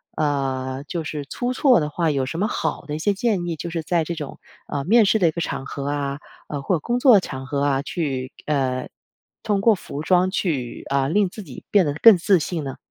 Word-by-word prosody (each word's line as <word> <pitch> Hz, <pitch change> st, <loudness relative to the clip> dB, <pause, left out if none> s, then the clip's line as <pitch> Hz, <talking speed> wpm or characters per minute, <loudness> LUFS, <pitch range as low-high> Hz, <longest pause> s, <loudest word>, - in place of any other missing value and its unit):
呃， 135 Hz, -2 st, -1 dB
就 170 Hz, -2 st, -3 dB
是 150 Hz, -2 st, -5 dB
出 245 Hz, -, -3 dB
错 255 Hz, -, +4 dB
的 150 Hz, -, -2 dB
话， 160 Hz, +1 st, 0 dB
有 135 Hz, -2 st, -1 dB
什 165 Hz, -, -4 dB
么 210 Hz, -, +1 dB
好 -, -, -2 dB
的 150 Hz, -, -5 dB
一 -, -, -4 dB
些 205 Hz, +5 st, +1 dB
建 200 Hz, -5 st, 0 dB
议？ 165 Hz, -, -2 dB
就 170 Hz, +2 st, -6 dB
是 165 Hz, -1 st, -2 dB
在 165 Hz, +1 st, 0 dB
这 170 Hz, -, -4 dB
种， 150 Hz, -4 st, -7 dB, 0.3 s
呃， 140 Hz, -1 st, -3 dB
面 225 Hz, +5 st, +5 dB
试 220 Hz, -, +3 dB
的 180 Hz, -, +3 dB
一 160 Hz, -, +2 dB
个 170 Hz, -, -4 dB
场 135 Hz, -, -3 dB
合 140 Hz, 0 st, -5 dB
啊 140 Hz, -1 st, -2 dB, 0.4 s
或 185 Hz, -, +1 dB
者 160 Hz, -, -1 dB
工 240 Hz, +10 st, -1 dB
作 245 Hz, -6 st, +7 dB
场 130 Hz, -6 st, -7 dB
合 140 Hz, 0 st, -1 dB
啊， 140 Hz, -1 st, +1 dB
去 135 Hz, -5 st, -3 dB
呃， 130 Hz, -4 st, -1 dB, 0.5 s
通 200 Hz, -2 st, 0 dB
过 225 Hz, +1 st, +5 dB
服 150 Hz, -6 st, -6 dB
装 185 Hz, +2 st, +3 dB
去， 150 Hz, -11 st, -2 dB
啊， 135 Hz, -1 st, +1 dB
令 200 Hz, +5 st, +2 dB
自 210 Hz, -, -9 dB
己 145 Hz, -9 st, -11 dB
变 200 Hz, -5 st, +5 dB
得 145 Hz, -, -1 dB
更 225 Hz, +6 st, +8 dB
自 190 Hz, +1 st, +4 dB
信 160 Hz, +1 st, -3 dB
呢？ 135 Hz, -2 st, -5 dB
155 Hz, 250 characters per minute, -22 LUFS, 140-190 Hz, 0.5 s, 更